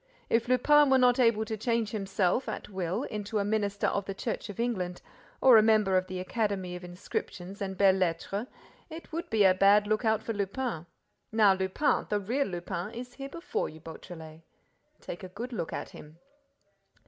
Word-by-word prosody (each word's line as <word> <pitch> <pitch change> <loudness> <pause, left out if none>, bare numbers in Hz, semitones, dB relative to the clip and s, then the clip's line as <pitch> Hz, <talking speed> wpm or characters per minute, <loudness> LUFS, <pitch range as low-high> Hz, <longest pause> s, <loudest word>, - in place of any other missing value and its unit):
If 230 +1 +2
Lupin 290 +4 +5
were 265 - +5
not 250 0 +4
able 230 -3 +3
to 220 - -3
change 230 0 -1
himself, 195 +1 0
at - - -6
will, 185 -3 -2
into 210 +1 -4
a 200 - +1
minister 205 -1 0
of 200 -1 0
the 195 - -5
Church 225 +1 -4
of 205 - -8
England 185 -7 -2 0.4
or 255 -3 +8
a - - +8
member 215 -3 +3
of 185 0 +2
the 185 0 -5
Academy 190 -2 -2
of 180 - -8
Inscriptions 180 +1 -6
and 190 -1 -3
Belles 195 -1 +4
Lettres, 185 +5 -1 0.4
it 325 +1 -10
would 335 +2 -4
be 220 -2 +3
a 190 -1 +6
bad 200 +2 +5
lookout 220 +1 +1
for 225 - -3
Lupin! 200 -3 -3 0.4
Now 215 -3 +5
Lupin, 190 +10 0
the 210 - +1
real 250 +8 -1
Lupin, 175 +2 -5
is 245 +1 -7
here 275 +1 -7
before 335 +5 -3
you, 160 - -12
Beautrelet! 160 0 -10 0.6
Take 175 - -7
a 185 - -7
good 235 +7 -7
look 170 -7 -3
at - - -5
him." 155 +2 -13
205 Hz, 185 wpm, -29 LUFS, 185-230 Hz, 0.6 s, or